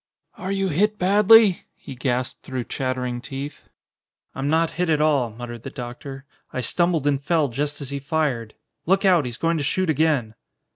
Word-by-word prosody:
"Are 190 - -5
you 195 -1 0
hit 210 +7 +1
badly?" 205 +1 +5
he 140 - -10
gasped 125 -1 -2
through 130 -2 -4
chattering 125 -1 -3
teeth. 140 +3 -7 0.6
"I'm 135 +1 -2
not 160 +1 +2
hit 180 - +1
at 155 -2 +3
all," 145 -6 +2
muttered 120 +1 -8
the 135 - -7
doctor. 135 +2 -8 0.3
"I 130 - -3
stumbled 170 +3 +1
and 140 -2 +1
fell 155 -2 +1
just 145 +4 -3
as 140 -1 -5
he 140 - -3
fired. 140 -6 -2 0.3
Look 195 +3 +3
out! 175 -6 +4
He's 120 -1 -5
going 165 -1 0
to - - -2
shoot 180 +4 +1
again!" 145 -7 +1
145 Hz, 180 wpm, -23 LUFS, 130-170 Hz, 0.6 s, badly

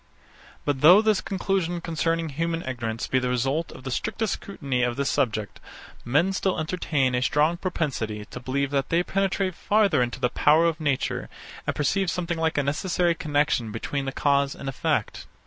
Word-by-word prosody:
But 140 -2 -1
though 175 +6 +9
this 215 -3 +2
conclusion 190 -3 -1
concerning 165 0 -1
human 165 +3 -2
ignorance 115 -3 -3
be 130 - +1
the 125 0 -1
result 135 +6 0
of 130 - -12
the 130 - -5
strictest 220 - -1
scrutiny 140 -10 -3
of 120 -1 +1
this 140 +1 0
subject, 110 -7 -1 0.4
men 150 +11 +2
still 190 -2 0
entertain 155 -5 0
a 125 - +1
strong 150 +5 +2
propensity 135 - -3
to - - -6
believe 135 +2 -2
that 140 -1 0
they 170 +1 +2
penetrate 195 0 0
farther 205 -3 +2
into 120 0 -2
the 125 - +1
powers 160 +6 +4
of 160 -1 -5
nature, 145 -4 -1 0.4
and - - 0
perceive 190 +6 +1
something 170 0 -2
like 160 -1 0
a 145 - +2
necessary 170 +4 +1
connexion 145 -7 0
between 135 +5 -3
the 135 - -2
cause 140 +1 +1
and 140 - -8
the - - -1
effect. 130 - -2
150 Hz, 180 wpm, -25 LUFS, 130-170 Hz, 0.4 s, though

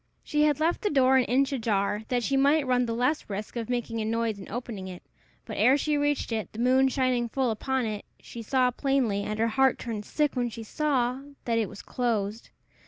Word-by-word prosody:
She 300 0 +2
had 295 -2 +2
left 325 +2 +1
the 415 - +1
door 265 -2 +4
an 255 - +3
inch 270 +3 +2
ajar, 210 -3 0
that 245 -2 0
she 275 - 0
might 280 +2 +3
run 250 -1 +2
the 230 - -2
less 255 +5 0
risk 205 +3 -5
of 230 -1 -4
making 235 -2 -2
a - - -2
noise 225 -1 -1
in 195 - -10
opening 225 -4 -5
it; 180 -1 -9 0.4
but - - -6
ere 250 +7 +5
she 300 +1 0
reached 290 -3 0
it, 220 -2 -3
the - - -10
moon 260 +2 +4
shining 255 -2 0
full 260 -1 0
upon 260 +3 -1
it, 210 -2 -4 0.2
she 235 - -9
saw 250 +2 +2
plainly, 255 -6 0
and 210 +1 -3
her 225 +1 +1
heart 265 +3 +3
turned 225 -4 -5
sick 295 +4 0
when 245 -1 0
she 230 0 -8
saw, 255 0 0 0.3
that 230 -1 +1
it 220 - -1
was - - -10
closed. 225 -3 -2
245 Hz, 225 wpm, -27 LUFS, 220-270 Hz, 0.4 s, ere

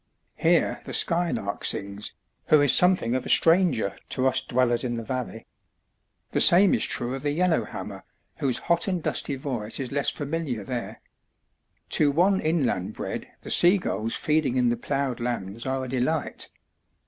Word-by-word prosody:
Here - - +1
the - - -7
skylark 170 - +1
sings, 100 +1 -1 0.3
who 155 - +5
is 145 -2 +3
something 180 -10 +2
of 130 - -1
a - - -7
stranger 165 - +2
to 130 - -2
us 130 - +1
dwellers 120 -1 0
in 120 -2 -3
the 115 - -5
valley. 125 -2 -5 0.9
The - - +1
same 185 +3 +7
is - - +2
true 120 +1 -3
of 135 - -5
the 145 - -1
yellow 170 +3 +1
hammer, - - -8 0.3
whose 130 -4 +1
hot 170 +2 0
and 180 -4 -2
dusty 140 - -1
voice 125 -5 -4
is 130 -3 -4
less 140 0 +1
familiar 145 -6 -4
there. 120 +3 -6 0.9
To 150 - +3
one 185 +7 +2
inland 150 - -1
bred - - -6 0.2
the - - -5
seagulls 175 - +3
feeding 150 -4 0
in 125 -1 +2
the 120 - +1
ploughed 135 +1 -3
lands 115 -1 -4
are 130 0 -2
a - - -7
delight. 130 +5 -2
135 Hz, 165 wpm, -25 LUFS, 120-160 Hz, 0.9 s, same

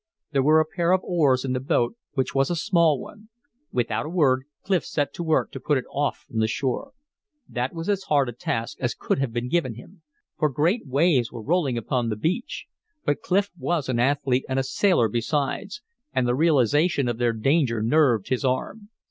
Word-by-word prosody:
There 140 -3 +2
were 155 +4 +5
a 155 - +3
pair 170 +3 0
of 185 - +2
oars 140 -7 +2
in 130 - -1
the 130 - 0
boat, 130 - 0 0.2
which 130 -2 -1
was 135 0 +2
a 175 - 0
small 165 -3 +2
one. 215 - -12 0.4
Without 120 +4 -1
a - - -5
word, 135 -7 +2 0.2
Clif 190 -3 +1
set 145 -2 -2
to 175 - -5
work 160 -1 +1
to - - -7
put 150 -2 +1
it 130 - -3
off 145 0 -2
from 115 - -4
the 110 - +2
shore. 140 - -2 0.5
That 125 +1 -2
was 165 0 -5
as 200 -2 0
hard 140 -3 +2
a - - -3
task 115 0 -4
as 125 -1 -1
could - - -1
have 135 -3 -1
been 120 +1 -3
given 130 -5 0
him; 165 - -14 0.4
for 155 - +3
great 155 - 0
waves 135 -3 +2
were 115 -2 -8
rolling 150 -4 +1
upon 120 +1 -1
the 110 - -1
beach. 180 - -2 0.4
But 145 - 0
Clif 200 +2 +1
was 170 -5 -2
an 120 -2 0
athlete 135 0 +1
and 130 - -1
a 135 - +2
sailor 155 - +2
besides; 145 - -2 0.3
and 125 - +1
the 120 - +2
realization 145 0 +3
of 120 -1 -2
their 120 -1 +2
danger 125 +1 +1
nerved 120 -4 +3
his 130 0 0
arm. 165 - -2
140 Hz, 205 wpm, -24 LUFS, 125-170 Hz, 0.5 s, were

